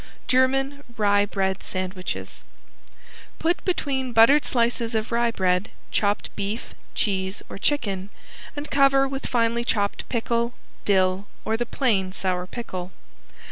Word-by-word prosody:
~GERMAN 270 +2 +2
RYE 205 -1 +4
BREAD 190 -1 -1
SANDWICHES~ 185 0 -4 0.9
Put 340 +2 0
between 270 -8 -1
buttered 230 +7 +7
slices 235 -1 +1
of 220 +1 -1
rye 235 0 +2
bread 185 -2 +1 0.2
chopped 205 0 0
beef, 205 +3 -4 0.2
cheese 190 -1 0
or - - -7
chicken, 200 -7 0 0.5
and 290 +1 -6
cover 275 -1 +5
with 270 0 -4
finely 235 -1 +1
chopped 205 -4 -1
pickle, 235 0 0 0.3
dill 190 0 +2 0.2
or 220 - +1
the 240 +1 -2
plain 205 -10 +1
sour 185 -2 -1
pickle. 185 -5 -6
225 Hz, 125 wpm, -24 LUFS, 195-260 Hz, 0.9 s, buttered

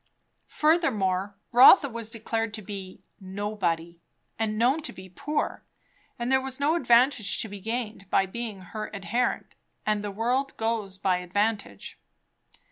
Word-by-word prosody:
Furthermore, 205 - +1 0.2
Rotha 270 +6 +8
was 230 -3 -6
declared 225 -1 -2
to 215 - -8
be 190 -1 -8 0.2
"nobody," 185 -4 -3 0.4
and 215 -1 -1
known 250 +7 +3
to 305 - -4
be 185 0 -12
poor; 295 - -3 0.5
there 260 +2 +2
was 265 0 -6
no 290 +3 +2
advantage 240 - +3
to - - -6
be 205 -1 -8
gained 220 -2 -4
by 195 - +3
being 215 0 -6
her 215 +4 -6
adherent; 235 +5 -1 0.3
and 210 -1 0
the 205 - -3
world 245 +7 -1
goes 220 -4 -2
by 190 -1 +1
advantage. 200 - -2
215 Hz, 135 wpm, -27 LUFS, 195-245 Hz, 0.5 s, Rotha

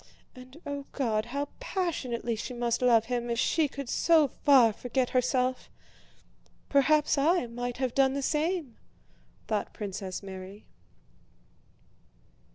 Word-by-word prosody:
And, 255 +4 -13
oh 285 -1 -5
God, 220 -6 0
how 280 +4 -3
passionately 285 - -2
she 245 +3 -6
must 240 0 -1
love 235 -3 +4
him 240 0 -2
if 235 - -1
she 315 +5 +2
could 275 -1 -7
so 320 +3 +4
far 255 -5 +4
forget 250 +3 -2
herself! 255 0 0 1.0
Perhaps 295 +1 +3
I 325 +1 +3
might 245 +1 -5
have 255 -2 -1
done 270 -1 +3
the 280 - -2
same!..." 310 -3 -1 0.7
thought 215 -2 -2
Princess 195 -2 -5
Mary. 190 +1 -9
255 Hz, 125 wpm, -29 LUFS, 235-285 Hz, 1.0 s, love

